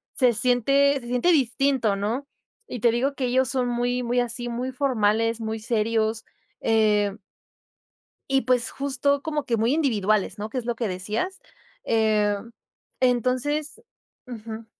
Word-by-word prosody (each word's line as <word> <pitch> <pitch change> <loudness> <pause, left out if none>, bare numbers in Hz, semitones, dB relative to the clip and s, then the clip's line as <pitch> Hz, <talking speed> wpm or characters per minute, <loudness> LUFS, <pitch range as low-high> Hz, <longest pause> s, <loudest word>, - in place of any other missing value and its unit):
se 250 -3 +4
siente 260 +5 +3
se 240 - -10
siente 250 +8 +2
distinto, 260 -5 +1
¿no? 225 +8 -2 0.4
Y 250 - -6
te 235 - +5
digo 265 +4 0
que 265 - -2
ellos 255 +1 +1
son 260 -2 0
muy 245 +1 -1
muy 245 +1 0
así, 240 0 -3
muy 245 +2 -3
formales, 230 -4 +1
muy 220 0 -3
serios, 220 0 0 0.4
eh. 210 -3 +2 1.1
Y, 270 0 +3
pues, 245 -1 +1
justo 280 +1 0
como 300 -1 -3
que 235 - 0
muy 230 +4 +2
individuales, 215 -10 +1
¿no? 210 +1 -4
Que 255 - -5
es 245 - -3
lo 240 -1 -1
que 230 -1 -2
decías, 210 - -3 0.4
em, 215 -1 +1 0.5
entonces 255 - 0 0.4
Ujú. 225 -2 -8
240 Hz, 145 wpm, -24 LUFS, 220-260 Hz, 1.1 s, te